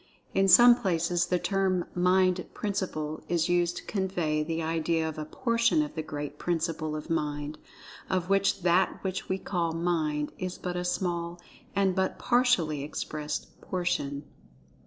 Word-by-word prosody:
In 195 0 +3
some 240 +6 +9
places 175 -6 0
the 180 - +2
term 190 -1 0
"Mind 180 0 +2
principle" 155 -7 -3
is 170 -1 +1
used 175 0 +2
to - - -6
convey 180 -6 -1
the 165 +1 -2
idea 160 0 0
of 155 -1 -5
"a 155 - -3
portion 235 - +2
of 295 - -6
the 160 - -3
Great 150 -1 -6
Principle 165 -2 -1
of 155 +2 -6
Mind, 150 -1 -2 0.5
of 185 -1 0
which 195 -1 +2
that 180 +1 +3
which 190 0 -3
we 190 - +1
call 170 -4 -2
'Mind' 160 -3 0
is 185 -1 -4
but 180 -1 -4
a 180 - -2
small 175 -1 -2 0.4
and 195 -1 +3
but 190 -1 0
partially 240 - +2
expressed 150 0 -5
portion." 145 -6 -2
175 Hz, 155 wpm, -28 LUFS, 155-190 Hz, 0.5 s, some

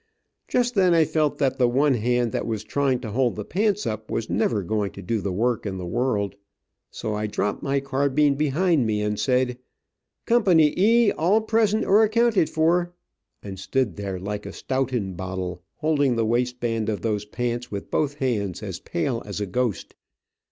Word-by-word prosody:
Just 245 0 +1
then 185 -5 +4
I 165 -1 +5
felt 155 -1 0
that 135 -2 0
the 125 - +4
one 135 +4 +3
hand 120 0 +1
that - - -2
was 110 -2 -3
trying 130 +3 0
to 110 -4 -6
hold 125 +1 +1
the 105 - -5
pants 210 +1 0
up, 110 0 -4
was 115 - -3
never 105 -1 +1
going 105 +1 -1
to - - -9
do 110 +4 -1
the 100 - -2
work 115 +5 0
in 95 -3 -4
the 90 - -5
world, 105 -1 -1 0.6
so 110 - -4
I 105 0 -2
dropped 105 0 -2
my 140 -1 0
carbine 140 +1 +1
behind 150 -1 +1
me, 105 -1 0
said, 125 +1 0 0.7
"Co. 240 -1 +3
E, 205 +9 +4
all 190 +8 +2
present 220 -1 +1
or 205 +3 +5
accounted 220 -4 +3
for," 175 +2 +1 0.5
and 95 -2 -7
stood 115 -2 -1
there 100 -2 -4
like 105 +2 -5
a - - -7
stoughton 130 -7 -2
bottle, 90 -1 -5
holding 145 -5 +1
the 115 -1 +1
waist 125 +2 0
band 115 -2 -1
of 105 - -2
those 105 -2 -1
pants 120 +2 -3
with 100 -1 -6
both 145 -2 0
hands, 110 - -2
as - - -5
pale 115 +7 -2
as 100 - -4
a 105 - -1
ghost. 115 +1 -2
125 Hz, 185 wpm, -24 LUFS, 105-150 Hz, 0.7 s, I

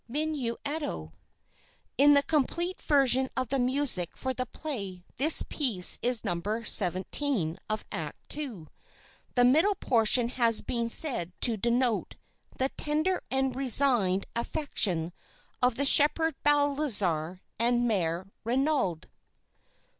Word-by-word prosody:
MINUETTO 285 - -4 0.8
In 290 +2 +5
the 280 - +3
complete 330 +5 -2
version 265 -3 +3
of 255 -3 -2
the 275 - -1
music 250 - 0
for 260 0 -3
the 255 0 -5
play 200 - -7
this 295 +5 +4
piece 225 - +2
is 245 -1 +3
No. 175 -4 -3 0.2
17 185 - 0
of 215 0 -3
Act - - -2
II. 250 - -7 0.7
The 245 - +3
middle 315 +11 +3
portion 235 - +2
has 235 -3 +2
been 235 -1 -3
said 230 - +1
to 235 - +2
denote 235 +2 -1 0.4
"the 265 +1 -1
tender 310 +7 -2
and 265 -1 -1
resigned 245 -7 +2
affection 205 - -1 0.5
of 250 -1 +1
the 280 - -1
Shepherd 315 +3 +4
Balthazar 240 - +2 0.2
and 240 +1 +1
Mère 180 -4 -2 0.2
Renaud." 250 - -1
250 Hz, 115 wpm, -27 LUFS, 205-285 Hz, 0.8 s, In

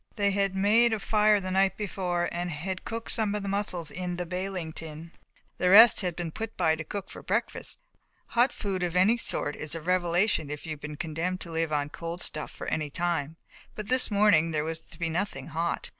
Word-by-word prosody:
They 200 -2 +2
had 195 -1 0
made 220 +4 +4
a 220 - -1
fire 210 +1 +3
on 200 - -1
the 185 - -3
night 190 +1 +2
before 180 -4 -1
and 175 +1 -3
had 180 +4 -4
cooked 230 0 -4
some 215 -3 0
of 205 - -3
the - - -4
mussels 195 -5 -2
in 180 -1 -4
the 175 0 -3
baling 180 -2 -4
tin, 160 +1 -8 0.5
the 180 - +2
rest 215 +4 +9
had 180 -3 -2
been 170 -2 -4
put 225 +5 -6
by 160 0 +3
to 160 - -6
cook 200 +4 -6
for - - -9
breakfast; - - -2 0.5
hot 245 +2 +3
food 195 -3 -3
of 175 -1 -1
any 205 +6 +5
sort 145 -9 0
is 155 +2 -5
a - - -3
revelation 175 -1 +1
if 150 0 -6
you 160 - -5
have 150 -1 -6
been 150 0 -6
condemned 165 +4 -2
to 170 - -7
live 165 -1 -1
on 145 -1 0
cold 170 +2 -1
stuff 150 - -1
for - - -9
any 155 -2 -2
time, 165 -2 -2 0.4
but 210 -1 -7
this 255 0 +3
morning 205 -6 +4
there 155 -2 -1
was 160 +1 -5
to 165 - -11
be 170 0 -1
nothing 165 -4 -3
hot. 165 +2 -2
180 Hz, 225 wpm, -28 LUFS, 160-200 Hz, 0.5 s, rest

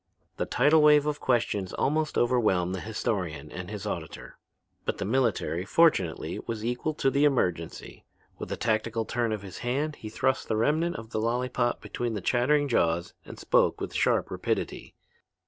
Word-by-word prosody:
The - - -2
tidal 155 +1 +4
wave 150 -1 +6
of 150 -1 -1
questions 110 -6 0
almost 155 +2 0
overwhelmed 110 -8 +2
the 95 - -3
historian 90 -8 -3
and 90 0 -7
his 105 -1 -6
auditor. 85 -6 -6 0.4
But - - -2
the - - -3
military, 110 -7 0
fortunately, 100 - +2
was 110 -1 -4
equal 125 +6 -2
to 135 - +1
the 140 +2 +2
emergency. 90 - -1 0.4
With - - -6
a - - -2
tactical 110 0 0
turn 120 -1 -1
of 105 -2 -3
his 95 -3 -9
hand 145 +5 -2
he 110 - -8
thrust 130 +4 0
the 110 - 0
remnant 155 +9 +1
of 110 0 -8
the 110 - -1
lollypop 120 +1 0
between 120 -2 -3
the - - -2
chattering 145 +7 +2
jaws 85 -8 +1
and - - -10
spoke - - +2
with - - -5
sharp - - +1
rapidity. - - -3
115 Hz, 170 wpm, -27 LUFS, 100-135 Hz, 0.4 s, wave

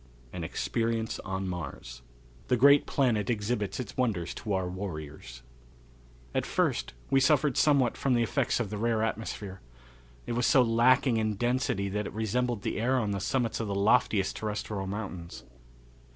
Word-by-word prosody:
An - - -5
Experience 115 -1 -2
On 95 -1 -4
Mars. 70 -8 -6 0.5
The 125 - +2
Great 140 +4 +6
Planet 120 -5 +1
Exhibits 105 -1 -1
Its 125 -5 -6
Wonders 105 -10 -1
to 105 -3 -4
Our 95 -1 0
Warriors. 75 -9 -7 0.9
At - - +1
first - - -1 0.2
we 135 - +5
suffered 145 -1 +3
somewhat 140 -6 +3
from 135 -2 +1
the 120 - +3
effects 115 - 0
of 110 -5 -2
the 105 - -4
rare 115 -1 +1
atmosphere. 105 -3 -4 0.6
It - - -5
was 120 0 +1
so 130 - +6
lacking 120 +1 +3
in 110 -1 0
density 120 -3 0
that 105 +1 -2
it - - -8
resembled 110 +1 -1
the - - -2
air 130 +3 +2
on 110 -5 0
the 100 - -2
summits 115 +4 -1
of 115 - -2
the 100 - -2
loftiest 105 -1 +2
terrestrial 105 -2 -3
mountains. 95 -4 -6
110 Hz, 165 wpm, -29 LUFS, 100-125 Hz, 0.9 s, Great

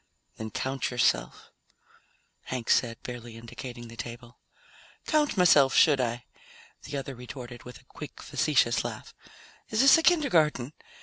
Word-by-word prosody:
"Then 110 0 -5
count 130 +5 -3
yourself," 125 -1 0 0.9
Hank 125 -3 -3
said, 115 -2 +2
barely 120 -2 -8
indicating 120 +1 -9
the 115 - -12
table. 120 +1 -9 0.7
"Count 300 -6 +1
myself, 145 -7 +5
should 145 -4 +5
I?" 120 -1 -3 0.6
the 145 - -5
other 135 0 -5
retorted 125 -1 -9
with 125 -2 -10
a - - -23
quick - - -10
facetious - - +1
laugh. - - -7 0.6
"Is 220 - +1
this 275 +4 +7
a - - +1
kindergarten? 160 - +2
125 Hz, 135 wpm, -28 LUFS, 120-150 Hz, 0.9 s, this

